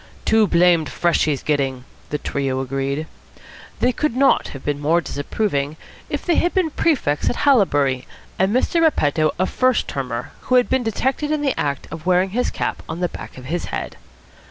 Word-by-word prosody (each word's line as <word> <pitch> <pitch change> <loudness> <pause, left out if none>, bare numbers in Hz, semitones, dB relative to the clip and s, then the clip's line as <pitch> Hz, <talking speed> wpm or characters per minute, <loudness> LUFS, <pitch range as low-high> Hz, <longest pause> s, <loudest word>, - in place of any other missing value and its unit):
"Too 220 -1 +4
blamed 170 -3 +3
fresh 175 -1 +1
he's 145 -3 -1
gettin'," 135 -4 0 0.3
the 150 - -1
trio 135 -2 -2
agreed. 135 +3 -2 0.8
They 250 - +4
could 280 0 -1
not 275 +1 +3
have 135 - -10
been 145 -1 -1
more 155 +4 +2
disapproving 145 -1 -2 0.3
if - - -3
they 345 - +2
had 350 - +1
been 360 -4 +2
prefects 260 - +1
at - - -2
Haileybury 145 - +3 0.3
and 190 +2 +3
Mr. 260 +8 +2
Repetto 155 - +2
a 185 - +2
first 255 +4 +1
termer 125 -4 -4
who 255 - +2
had 250 -1 +4
been 260 0 +2
detected 265 +6 -1
in 305 -1 0
the 275 - +2
act 140 -2 -2
of 160 +2 -8
wearing 185 +1 +3
his 245 +4 0
cap - - -3
on 170 - -4
the 180 -1 0
back - - -9
of 130 - -10
his 170 +6 -2
head. - - -5
170 Hz, 185 wpm, -21 LUFS, -, 0.8 s, Too